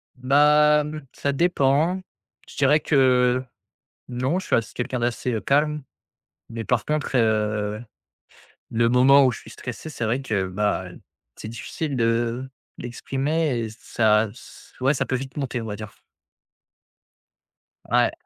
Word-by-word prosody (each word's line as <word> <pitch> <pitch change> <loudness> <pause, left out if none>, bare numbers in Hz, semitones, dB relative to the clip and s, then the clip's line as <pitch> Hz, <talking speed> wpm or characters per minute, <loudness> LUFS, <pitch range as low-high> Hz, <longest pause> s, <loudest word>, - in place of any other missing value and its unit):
Ben. 150 +3 +3
Ça 140 - -1
dépend, 160 +3 +2 0.5
je - - -14
dirais 150 +2 +4
que 130 -3 +3 0.7
non, 130 +7 -1
je 190 - -6
suis - - +2
assez 115 -2 -2
quelqu'un 125 +1 -3
d'assez, 120 +1 -1
heu, 110 - -1
calme, 150 +6 +1 0.7
mais 115 -1 -6
par 115 -2 0
contre, 150 -3 -1
heu, 105 -1 0 0.9
le 115 +1 +2
moment 135 +3 +6
où 125 - +2
je - - -8
suis - - -14
stressé, 125 +6 -7
c'est 120 -5 -4
vrai 125 +5 0
que, 100 -7 -1
ben, 95 -2 -2 0.4
c'est 110 - -8
difficile 135 +5 -4
de 115 +2 0 0.3
d'exprimer 135 +3 -1
et 115 - -3
ça, 110 0 +1
ç 120 - -15
ouais, 135 +3 +3
ça - - 0
peut - - -3
vite 135 +2 -7
monter, 130 -4 -2
on 115 - -6
va 105 -1 -4
dire. 105 -1 -10 1.9
Ouais. - - +3
125 Hz, 145 wpm, -23 LUFS, 115-140 Hz, 1.9 s, moment